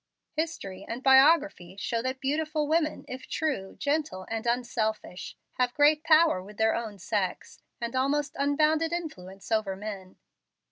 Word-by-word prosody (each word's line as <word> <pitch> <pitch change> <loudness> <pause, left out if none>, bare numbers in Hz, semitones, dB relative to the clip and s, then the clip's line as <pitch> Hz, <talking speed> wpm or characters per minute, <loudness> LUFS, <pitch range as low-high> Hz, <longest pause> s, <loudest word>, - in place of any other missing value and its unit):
History 245 - -3
and 240 +3 -5
biography 270 - +4
show 230 +3 -1
that 260 +2 -3
beautiful 305 +2 -1
women, 310 0 0
if 255 +1 -8
true, 270 -12 -2
gentle, 290 -10 -1
and 225 +1 -3
unselfish, 220 -5 -2 0.2
have 250 -1 +1
great 300 +1 +4
power 320 - +5
with 205 +3 -13
their 220 0 +3
own 220 -3 -4
sex, 190 0 -3 0.2
and 235 +1 -4
almost 290 +3 0
unbounded 305 +3 +2
influence 195 - -6
over 215 -3 +1
men. 195 -2 -7
255 Hz, 140 wpm, -28 LUFS, 210-305 Hz, 0.2 s, power